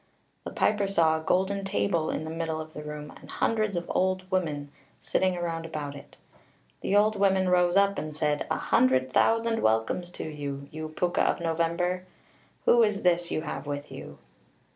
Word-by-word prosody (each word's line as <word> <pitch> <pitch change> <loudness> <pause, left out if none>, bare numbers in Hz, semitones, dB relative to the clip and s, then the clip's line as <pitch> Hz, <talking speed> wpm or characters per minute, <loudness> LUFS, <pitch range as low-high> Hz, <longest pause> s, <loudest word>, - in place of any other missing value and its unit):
The - - -3
piper 205 -2 +1
saw 165 -5 +3
a 160 - -4
golden 190 +3 +1
table 195 -4 0
in - - -2
the 160 - -5
middle 165 -1 -2
of 155 0 -8
the 150 - -7
room, 150 0 -7
and - - -14
hundreds 215 -3 0
of 175 - -2
old 185 0 +1
women 150 -6 -1 0.3
(cailleacha) - - -22
sitting 185 -1 +1
round 165 -2 -3
about 150 -3 -5
it. 140 - -13 0.6
The 200 - 0
old 210 +1 +4
women 190 -2 +3
rose 180 -1 +3
up, 200 0 +3
and 155 -1 -6
said, 150 -1 0
"A - - 0
hundred 130 0 +2
thousand 225 0 +2
welcomes 110 +11 +1
to - - -5
you, 140 -2 -5
you 155 0 -6
Púca 175 +3 -1
of - - 0
November 170 +1 0
(na 180 +1 0
Samhna). 180 - -17 0.7
Who 240 - +5
is 210 -3 +1
this 175 -1 +2
you - - -1
have 150 - -5
with 145 0 -5
you?" 70 - -9
170 Hz, 195 wpm, -27 LUFS, 150-190 Hz, 0.7 s, Who